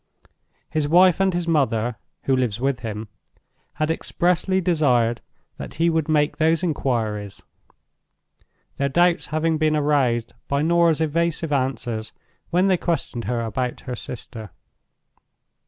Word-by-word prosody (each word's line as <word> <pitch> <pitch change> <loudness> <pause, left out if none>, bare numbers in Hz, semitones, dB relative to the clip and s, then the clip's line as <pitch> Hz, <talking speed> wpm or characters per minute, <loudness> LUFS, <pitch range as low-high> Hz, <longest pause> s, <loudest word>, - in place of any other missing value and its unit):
His 155 -2 -1
wife 180 +3 +5
and 195 0 +3
his 175 -1 -2
mother 125 -7 +1 0.3
(who 135 - +2
lives 120 -4 -1
with 135 -1 0
him) 110 -1 -5 0.7
had 155 +1 -1
expressly 180 +3 +1
desired 130 -10 +2 0.4
that - - -8
he 165 +2 +2
would 160 -1 0
make 150 -1 +2
those 160 +2 +2
inquiries; 110 - -2 1.3
their 140 0 0
doubts 175 +4 +2
having 155 +1 0
been 155 -1 +2
aroused 135 -6 +1
by 140 +1 0
Norah's 170 -1 +3
evasive 165 0 0
answers 120 -5 -2 0.4
when 180 +3 +2
they 190 -2 +3
questioned 140 -9 -2
her 120 +2 -1
about 120 +2 -3
her 125 -2 -5
sister. 110 -3 -7
150 Hz, 130 wpm, -23 LUFS, 120-165 Hz, 1.3 s, wife